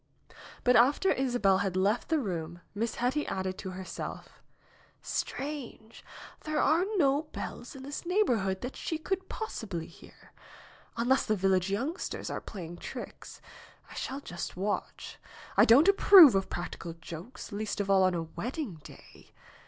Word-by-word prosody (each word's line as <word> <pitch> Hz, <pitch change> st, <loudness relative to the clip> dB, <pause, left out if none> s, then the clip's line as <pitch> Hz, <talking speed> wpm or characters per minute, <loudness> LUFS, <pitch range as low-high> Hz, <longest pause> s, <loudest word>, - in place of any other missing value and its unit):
But 250 Hz, 0 st, +4 dB
after 275 Hz, +11 st, +4 dB
Isabel 245 Hz, -8 st, +2 dB
had 195 Hz, -2 st, -1 dB
left 205 Hz, +5 st, +1 dB
the 320 Hz, -, +3 dB
room 175 Hz, -, -4 dB
Miss 220 Hz, +2 st, -2 dB
Hetty 260 Hz, +5 st, 0 dB
added 190 Hz, -1 st, -2 dB
to 190 Hz, -, -5 dB
herself: 185 Hz, 0 st, -7 dB, 0.6 s
"Strange! 265 Hz, -6 st, -5 dB, 0.4 s
There 310 Hz, -1 st, -2 dB
are 335 Hz, +4 st, +3 dB
no 290 Hz, -1 st, +2 dB
bells -, -, -7 dB
in 265 Hz, -, -9 dB
this 285 Hz, +2 st, -6 dB
neigh 365 Hz, +5 st, +3 dB
borhood 195 Hz, -, 0 dB
that 250 Hz, -, -5 dB
she 320 Hz, -, -3 dB
could 375 Hz, +4 st, -3 dB
possibly 205 Hz, -, -5 dB
hear. -, -, -17 dB, 0.6 s
Unless 245 Hz, +3 st, +2 dB
the 215 Hz, -, +2 dB
village 190 Hz, -1 st, +2 dB
youngsters 270 Hz, -, -3 dB
are -, -, -4 dB
playing 175 Hz, -4 st, -8 dB
tricks. -, -, -9 dB, 0.5 s
I -, -, -9 dB
shall 270 Hz, +2 st, -4 dB
just 175 Hz, -6 st, -6 dB
watch. 205 Hz, +3 st, -4 dB, 0.4 s
I -, -, +7 dB
don't 270 Hz, +10 st, +7 dB
approve 390 Hz, -, +9 dB
of 195 Hz, -1 st, 0 dB
practical 170 Hz, -1 st, -5 dB
jokes, 165 Hz, +7 st, -9 dB
least 210 Hz, +1 st, -3 dB
of 200 Hz, -, -1 dB
all 195 Hz, -1 st, +5 dB
on 185 Hz, -1 st, +3 dB
a 165 Hz, -, -1 dB
wed 220 Hz, +10 st, -5 dB
ding 220 Hz, -, -5 dB
day. -, -, -15 dB
220 Hz, 155 wpm, -30 LUFS, 190-285 Hz, 0.6 s, approve